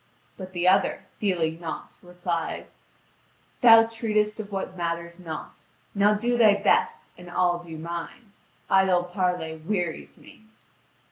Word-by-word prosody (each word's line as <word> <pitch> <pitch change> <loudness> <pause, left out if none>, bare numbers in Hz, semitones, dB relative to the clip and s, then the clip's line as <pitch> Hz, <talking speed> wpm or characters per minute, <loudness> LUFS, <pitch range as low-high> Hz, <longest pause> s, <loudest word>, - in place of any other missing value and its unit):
But 185 -1 -9
the 175 0 0
other, 195 +1 +3 0.2
fearing 170 -5 0
naught, 160 -3 -6
replies: 175 -2 -5 0.8
"Thou 225 -2 +9
treatest 215 -2 -1
of 210 -1 -6
what 190 -1 -4
matters 170 0 -4
not. 160 -3 -8 0.3
Now 205 +1 +3
do 240 +3 0
thy 215 -3 +6
best, 205 - +1
and 180 0 -11
I'll 175 0 +1
do 165 -2 -9
mine. 170 +6 -7 0.4
Idle 190 -2 +3
parley 180 -3 -2
wearies 175 0 -4
me." 220 - -17
180 Hz, 130 wpm, -25 LUFS, 170-210 Hz, 0.8 s, Thou